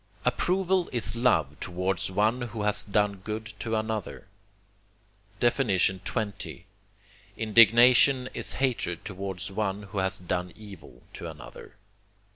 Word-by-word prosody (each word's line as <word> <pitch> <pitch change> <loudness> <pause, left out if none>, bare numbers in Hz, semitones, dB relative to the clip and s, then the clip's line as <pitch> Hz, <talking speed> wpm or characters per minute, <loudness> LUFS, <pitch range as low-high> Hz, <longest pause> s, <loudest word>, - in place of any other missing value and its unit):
Approval 185 0 +1
is 115 -3 -1
love 80 - +1
towards 90 +1 -1
one 105 +6 +1
who 115 -3 -4
has 105 0 +2
done 105 0 0
good 110 +3 -5
to 115 -1 -2
another. 110 -3 -3 1.1
XX. 105 -3 0 0.7
Indignation 120 +4 +6
is - - -2
hatred 120 -10 -1
towards 95 0 -5
one 100 0 -2
who 100 0 -5
has 95 0 0
done 90 0 -3
evil 95 - -13
to - - -7
another. - - -12
105 Hz, 110 wpm, -27 LUFS, 95-115 Hz, 1.1 s, Indignation